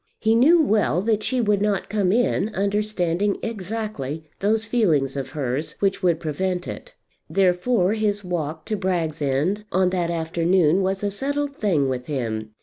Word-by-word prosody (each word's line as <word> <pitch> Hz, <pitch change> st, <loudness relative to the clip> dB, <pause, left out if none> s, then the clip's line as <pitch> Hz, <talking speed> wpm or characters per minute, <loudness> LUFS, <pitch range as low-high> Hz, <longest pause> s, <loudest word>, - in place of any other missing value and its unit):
He 220 Hz, 0 st, +2 dB
knew 290 Hz, +10 st, +6 dB
well 205 Hz, -, +2 dB
that 215 Hz, -1 st, +1 dB
she 255 Hz, +4 st, 0 dB
would 210 Hz, -3 st, +1 dB
not 205 Hz, -3 st, 0 dB
come 200 Hz, -3 st, +1 dB
in, 220 Hz, -3 st, +1 dB
understanding 200 Hz, -2 st, 0 dB
exactly 210 Hz, -, -4 dB, 0.2 s
those 215 Hz, +2 st, +1 dB
feelings 165 Hz, -, +1 dB
of 135 Hz, -1 st, -4 dB
hers 135 Hz, +2 st, -2 dB
which 195 Hz, 0 st, 0 dB
would 175 Hz, -4 st, +2 dB
prevent 180 Hz, +3 st, -2 dB
it. -, -, -8 dB, 0.3 s
Therefore 185 Hz, +3 st, +2 dB
his 210 Hz, -2 st, -1 dB
walk 160 Hz, -3 st, -4 dB
to 220 Hz, -, -2 dB
Bragg's 175 Hz, -5 st, -2 dB
End 145 Hz, +10 st, 0 dB
on 185 Hz, 0 st, +2 dB
that 175 Hz, -2 st, 0 dB
afternoon 170 Hz, +1 st, +2 dB
was 190 Hz, +1 st, -1 dB
a 205 Hz, -, 0 dB
settled 280 Hz, +6 st, -2 dB
thing 170 Hz, -, +1 dB
with 125 Hz, -1 st, -3 dB
him. 110 Hz, -6 st, -3 dB
190 Hz, 160 wpm, -23 LUFS, 160-210 Hz, 0.3 s, knew